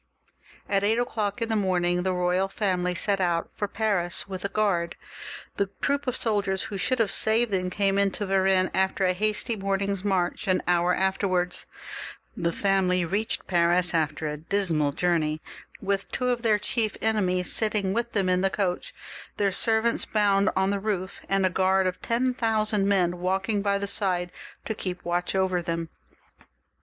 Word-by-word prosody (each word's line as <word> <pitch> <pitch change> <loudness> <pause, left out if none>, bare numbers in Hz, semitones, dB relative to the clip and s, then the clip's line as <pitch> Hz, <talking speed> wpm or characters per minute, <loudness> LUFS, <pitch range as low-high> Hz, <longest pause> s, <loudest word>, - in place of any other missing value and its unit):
At 195 -1 +1
eight 220 +3 +2
o'clock 230 -2 -1
in 230 - -3
the 220 - +1
morning 180 -3 +1
the 185 +1 0
royal 180 +1 +1
family 180 -3 -1
set 200 +2 +1
out 170 -2 0
for 205 - -3
Paris 200 -5 0
with 185 -2 -6
a 200 - -1
guard; 195 -6 0 0.6
the 200 -1 0
troop 280 0 -1
of 255 - 0
soldiers 200 -5 0
who 200 - -5
should 255 +6 +1
have 225 -4 +1
saved 225 +1 +2
them, 185 -2 0
came 195 +1 +1
into 200 +1 0
Varennes 190 -1 +2
after 190 0 +1
a 185 - +2
hasty 215 +4 -1
morning's 195 -1 -1
march 185 -3 -1
an 185 -1 +2
hour 175 0 +3
after 190 +1 0
they - - -3
had 180 - +4 1.0
left 170 +2 -3
it. 195 -1 +3
They 180 -1 +2
reached 205 +6 -2
Paris 175 0 +2
after 155 -1 0
a 150 0 -3
dismal 160 -3 0
journey 155 -1 0 0.4
with 195 0 -1
two 250 -1 -1
of 245 -1 0
their 220 -3 +3
chief 215 0 -1
enemies 185 -5 +2
sitting 210 -3 +1
with 235 +2 -2
them 195 -3 +1
in 180 0 +2
the 195 - +2
coach, 200 - -2 0.4
their 200 -1 +2
servants 225 +3 +2
bound 200 -1 +2
on 190 +1 +2
the 200 - -1
roof, 195 -2 -3
and 195 -1 +2
a - - +3
guard 190 +1 +2
of 185 0 -2
ten 250 +2 0
thousand 215 -4 +1
men 180 -3 +1
walk 190 +2 -1
ing 205 -2 +1
by 200 0 +1
the 200 - -3
side 180 -3 -1 0.3
to 220 - -2
keep 185 -3 -5
watch 175 +2 -1
over 185 -2 +1
them. 165 -1 -3
195 Hz, 185 wpm, -26 LUFS, 180-210 Hz, 1.0 s, had